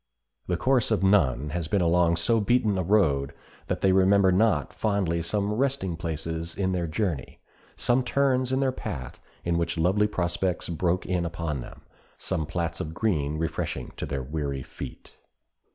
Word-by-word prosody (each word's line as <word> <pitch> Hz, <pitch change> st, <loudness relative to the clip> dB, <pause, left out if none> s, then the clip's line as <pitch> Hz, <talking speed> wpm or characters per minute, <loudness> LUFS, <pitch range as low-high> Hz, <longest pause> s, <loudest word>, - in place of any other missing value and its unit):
The 90 Hz, -, 0 dB
course 130 Hz, +5 st, +2 dB
of 95 Hz, -, +1 dB
none 75 Hz, -8 st, +3 dB
has 85 Hz, -1 st, -2 dB
been 100 Hz, +4 st, +1 dB
along 85 Hz, 0 st, +3 dB
so 110 Hz, +8 st, +2 dB
beaten 110 Hz, -1 st, +2 dB
a 95 Hz, -, 0 dB
road 80 Hz, -8 st, +2 dB, 0.3 s
that -, -, -2 dB
they 95 Hz, -, +4 dB
remember 95 Hz, 0 st, +5 dB
not 90 Hz, -, +2 dB
fondly 95 Hz, -6 st, 0 dB
some 100 Hz, +4 st, -1 dB
resting 125 Hz, -7 st, 0 dB
places 80 Hz, 0 st, -4 dB
in 95 Hz, -1 st, 0 dB
their 90 Hz, -2 st, -1 dB
journey, 80 Hz, -, -3 dB, 0.4 s
some 125 Hz, +1 st, +2 dB
turns 130 Hz, 0 st, +1 dB
in 130 Hz, +1 st, +1 dB
their 135 Hz, -1 st, +2 dB
path 75 Hz, -, -6 dB, 0.3 s
in 85 Hz, 0 st, +1 dB
which 85 Hz, 0 st, -1 dB
lovely 95 Hz, +6 st, +3 dB
prospects 90 Hz, -2 st, -1 dB
broke 85 Hz, +2 st, 0 dB
in 90 Hz, -1 st, 0 dB
upon 85 Hz, -4 st, -3 dB
them, -, -, -10 dB, 0.4 s
some 80 Hz, -5 st, -2 dB
plats 85 Hz, 0 st, -2 dB
of 80 Hz, +1 st, -5 dB
green 75 Hz, -9 st, 0 dB
refreshing 80 Hz, +1 st, -3 dB
to -, -, -4 dB
their 70 Hz, -2 st, -3 dB
weary 70 Hz, -1 st, -3 dB
feet. -, -, -9 dB
85 Hz, 170 wpm, -26 LUFS, 80-105 Hz, 0.4 s, remember